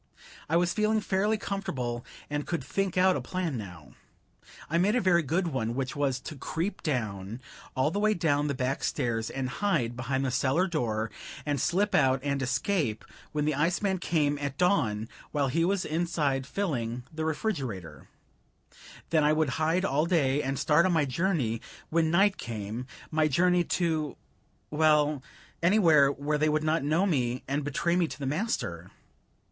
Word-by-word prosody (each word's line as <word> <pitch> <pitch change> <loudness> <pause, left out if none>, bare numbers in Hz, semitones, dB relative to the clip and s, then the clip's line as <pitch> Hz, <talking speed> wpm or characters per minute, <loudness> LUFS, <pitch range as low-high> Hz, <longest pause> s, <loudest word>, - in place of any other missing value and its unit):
I 165 - +3
was 175 0 +2
feeling 215 0 +2
fairly 205 +2 +1
comfortable, 145 - -3 0.2
and 145 0 -2
I - - -10
could 170 -6 -2
think 190 +6 -2
out 185 0 +5
a - - -2
plan 180 -6 -3
now. 90 - -8 0.7
I 165 +2 +1
made 205 +6 +3
a - - +4
very 180 -4 +4
good 170 +4 0
one; 120 -5 -2
which 135 +1 -2
was, 140 -3 0
to 150 - -7
creep 165 +8 -3
down, 110 - -3 0.4
all 130 +4 +2
the 200 - -1
way 215 0 +3
down 150 -4 +1
the 140 - -1
back 130 +1 -1
stairs, 115 -2 -1
and 135 -1 -3
hide 130 - 0
behind 130 +1 -1
the 130 - 0
cellar 140 +8 +2
door, 115 - -1 0.3
and 145 -3 0
slip 200 +4 +1
out 130 -2 +4
and 140 -1 -1
escape 130 - 0 0.3
when 150 -1 -1
the 155 - +1
iceman 180 +6 +1
came 145 -4 +1
at 140 -1 -4
dawn, 125 - +1 0.3
while 140 -3 +1
he 165 +5 +1
was 190 +2 +1
inside 150 -5 0
filling 125 - -2
the 160 0 -3
refrigerator; 135 - -3 1.0
then 160 -2 +4
I 150 +1 +4
would 155 -2 +2
hide 165 +4 +2
all 150 0 +1
day, 145 -5 +2
and 135 0 -2
start 155 +6 +4
on 185 - +1
my 160 -3 +3
journey 135 - 0 0.3
when 160 0 +2
night 195 +4 +3
came; 115 +2 -5 0.2
my 155 -1 +3
journey 175 +4 +3
to 160 -5 -1 0.5
well, 150 -2 +3 0.4
anywhere 165 -7 +5
where 150 +2 -2
they 155 +1 +3
would 155 0 +1
not 155 -1 +1
know 155 +6 +2
me 130 -8 0
and 140 +2 -1
betray 155 +5 0
me 175 -2 +2
to - - -8
the 140 - -5
master. 180 - -2
150 Hz, 175 wpm, -28 LUFS, 130-175 Hz, 1.0 s, out